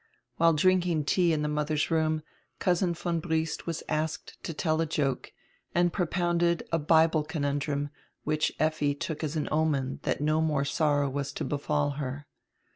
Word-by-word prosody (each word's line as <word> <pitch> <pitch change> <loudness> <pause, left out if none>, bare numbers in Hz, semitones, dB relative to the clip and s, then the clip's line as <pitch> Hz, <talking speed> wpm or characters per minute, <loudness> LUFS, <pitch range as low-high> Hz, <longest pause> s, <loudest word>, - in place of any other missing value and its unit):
While 165 0 +5
drinking 175 -1 +2
tea 175 +2 +3
in 155 -2 0
the - - 0
mother's 150 +1 0
room 155 -1 +1 0.3
Cousin 175 -1 +1
von 170 0 -1
Briest 160 0 -2
was 165 -2 -3
asked 155 0 -3
to - - -3
tell 160 0 0
a 165 - 0
joke, 140 -4 -1 0.4
and 175 0 +3
propounded 175 -1 +1
a 165 - +2
Bible 160 +1 +4
conundrum, 145 -2 -2 0.3
which 155 0 +1
Effi 155 -2 +1
took 155 +2 -4
as 155 0 -2
an 155 - -1
omen 150 -4 0
diat - - -1
no 155 +2 +2
more 150 -3 +1
sorrow 145 0 +2
was 140 0 -3
to - - -3
befall 145 0 0
her. 140 +2 -5
155 Hz, 165 wpm, -28 LUFS, 145-165 Hz, 0.4 s, While